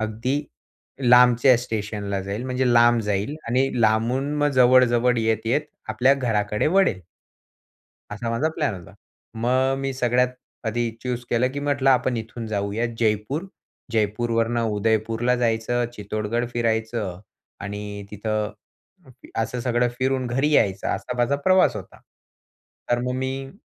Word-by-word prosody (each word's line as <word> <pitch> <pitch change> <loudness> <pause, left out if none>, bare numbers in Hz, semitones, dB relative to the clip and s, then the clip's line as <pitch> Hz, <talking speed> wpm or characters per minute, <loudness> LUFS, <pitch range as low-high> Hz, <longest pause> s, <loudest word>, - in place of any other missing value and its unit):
अगदी 115 +7 -2 0.7
लांबच्या 125 +1 +6
स्टेशनला 105 -4 -3
जाईन. 100 +5 -4
म्हणजे 125 -1 +1
लांब 120 0 +5
जाईन 105 +7 -1
आणि 130 +3 +2
लांबून 120 +6 +1
मग 145 - +3
जवळ-जवळ 125 -1 +5
येत-येत, 115 +5 +1 0.3
आपल्या 125 +5 +3
घराकडे 105 -5 0
वळेन. 175 - +2 1.1
असा 115 +2 -4
माझा 140 +7 0
प्लॅन 145 -10 0
होता. 95 +3 -12 0.5
मग 130 +2 +2
मी 135 0 -2
सगळ्यात 125 0 +2 0.4
आधी 115 +1 -1
च्यूज 125 -1 -3
केलं, 120 +2 +2
की 140 - -4
म्हटलं 140 -2 +1
आपण 125 -1 +2
इथून 115 +1 -6
जाऊयात 105 +2 -2
जयपूर. 115 - 0 0.5
जयपूरवरून 115 +2 0
उदयपूरला 115 +2 0
जायचं, 120 0 0
चित्तोडगड 110 +3 -3
फिरायचं 110 -5 -2 0.4
आणि 100 0 -6
तिथं 105 0 -2 0.8
असं 120 +2 -2
सगळं 120 0 +1
फिरून 130 -1 0
घरी 135 +5 0
यायचं 100 -8 +2
असा 125 - -3
माझा 120 +4 +2
प्रवास 185 - +4
होता. 95 -2 -10 0.9
तर 120 - +3
मग 125 - -1
मी 135 +1 -4
120 Hz, 125 wpm, -23 LUFS, 110-125 Hz, 1.1 s, लांबच्या